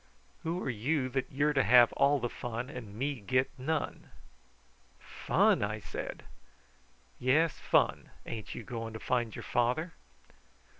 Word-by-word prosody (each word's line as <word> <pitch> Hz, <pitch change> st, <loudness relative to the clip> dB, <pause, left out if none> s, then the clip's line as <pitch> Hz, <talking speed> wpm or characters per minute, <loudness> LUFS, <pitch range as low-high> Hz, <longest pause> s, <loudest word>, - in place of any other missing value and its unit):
"Who 165 Hz, +2 st, -2 dB
are -, -, -2 dB
you 130 Hz, +4 st, 0 dB
that 130 Hz, +1 st, -2 dB
you're 145 Hz, +2 st, +2 dB
to 135 Hz, -, +4 dB
have 120 Hz, +1 st, +6 dB
all 145 Hz, +1 st, +4 dB
the 120 Hz, -, -1 dB
fun 120 Hz, +2 st, -5 dB
and 110 Hz, -7 st, -8 dB
me 135 Hz, +3 st, -2 dB
get 130 Hz, +6 st, +1 dB
none!" 145 Hz, +4 st, -3 dB, 0.9 s
"Fun!" -, -, +2 dB
I 105 Hz, +1 st, -1 dB
said. -, -, -6 dB, 1.0 s
"Yes, 150 Hz, +6 st, +2 dB
fun. -, -, +2 dB, 0.2 s
Ain't 110 Hz, -2 st, -6 dB
you 120 Hz, -, -6 dB
goin' 115 Hz, 0 st, -5 dB
to 110 Hz, -, -6 dB
find 120 Hz, -3 st, -1 dB
your -, -, -7 dB
father?" 125 Hz, +8 st, 0 dB
125 Hz, 145 wpm, -31 LUFS, 115-145 Hz, 1.0 s, have